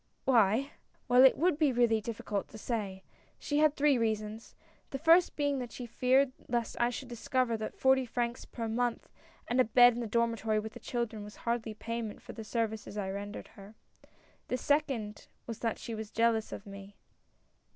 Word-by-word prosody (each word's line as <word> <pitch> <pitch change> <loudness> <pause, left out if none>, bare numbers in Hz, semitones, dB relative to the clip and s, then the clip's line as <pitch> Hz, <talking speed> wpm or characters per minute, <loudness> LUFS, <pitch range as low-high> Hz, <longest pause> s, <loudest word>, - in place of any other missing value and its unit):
" - - -44
"Why? 235 +2 +3 0.4
Well, 250 0 +6
it 265 - +7
would 335 -2 +2
be 300 -4 +4
really 235 -3 +3
difficult 210 -3 -4
to 220 - -11
say 205 -4 -4 0.2
— - - -34
she 290 0 -1
had 305 -1 +4
three 285 -3 +3
reasons. 220 0 -3 0.3
The 270 - -4
first 330 +4 +5
being 285 -2 0
that 245 -2 -6
she 250 - -7
feared 255 +3 +2 0.2
lest 235 -2 -1
I 240 - +3
should 250 +2 -6
discover 245 0 -1
that 215 0 -5
forty 265 -1 +3
francs 235 +1 -2
per 230 -2 -5
month 240 +1 -1 0.4
and 245 +2 +3
a - - +5
bed 245 +2 +6
in 235 - -5
the 235 - -3
dormitory 230 -1 0
with 215 +1 -3
the - - -9
children, 235 -3 -3
was 210 0 -10
hardly 235 -2 -3
payment 230 -1 -5
for - - -10
the 225 - -7
services 220 -1 -3
I 190 -2 -2
rendered 205 +1 -6
her. 200 +1 -14 0.7
The 250 - -1
second 265 -7 -1 0.2
was 230 -1 -6
that 230 -2 -1
she 230 - -6
was 220 -1 -5
jealous 225 -1 +1
of 200 - -7
me." 200 0 -11
235 Hz, 195 wpm, -31 LUFS, 215-255 Hz, 0.7 s, it